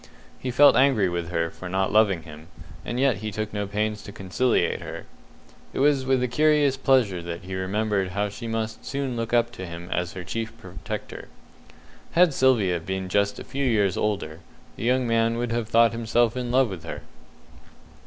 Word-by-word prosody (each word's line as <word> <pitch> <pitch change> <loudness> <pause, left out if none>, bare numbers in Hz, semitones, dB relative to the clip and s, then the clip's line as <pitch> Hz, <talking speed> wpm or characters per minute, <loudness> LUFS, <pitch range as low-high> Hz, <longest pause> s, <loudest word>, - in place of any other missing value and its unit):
He 130 - -4
felt 140 +4 +6
angry 130 -8 +4
with 85 -1 -3
her 85 -1 -1
for 90 - -8
not 95 +1 0
loving 100 -6 +3
him, 75 0 -12 0.4
and 120 - -3
yet 135 -3 +3
he 110 +2 -4
took 110 +1 -4
no 105 -1 -2
pains 105 +1 -2
to 100 - -10
conciliate 100 +6 0
her. - - -7 0.7
It - - -3
was 135 -1 +3
with 130 -1 +2
a - - +1
curious 150 +1 +3
pleasure 130 -9 +2
that 85 0 -6
he 95 +1 -7
remembered 100 +1 -1
how 100 +1 0
she 105 +3 -7
must 110 -1 -3
soon 140 -3 -3
look 115 0 -3
up 120 0 +2
to 95 -5 -7
him 85 +1 -8
as 90 -1 -1
her 90 - -6
chief 115 +6 -5
protector. 95 -3 -7 0.9
Had 175 -3 +5
Sylvia 110 -10 +3
been 95 +2 -4
just 100 +1 +1
a - - -7
few 140 +1 -4
years 105 -7 +2
older, 95 -7 -2 0.4
the - - -5
young 125 +1 +2
man 115 0 +1
would 120 -1 -2
have 115 -1 -2
thought 115 0 +5
himself 115 0 +1
in 125 -1 -3
love 130 0 +3
with 90 -4 -7
her. 85 - -7
110 Hz, 195 wpm, -25 LUFS, 95-125 Hz, 0.9 s, felt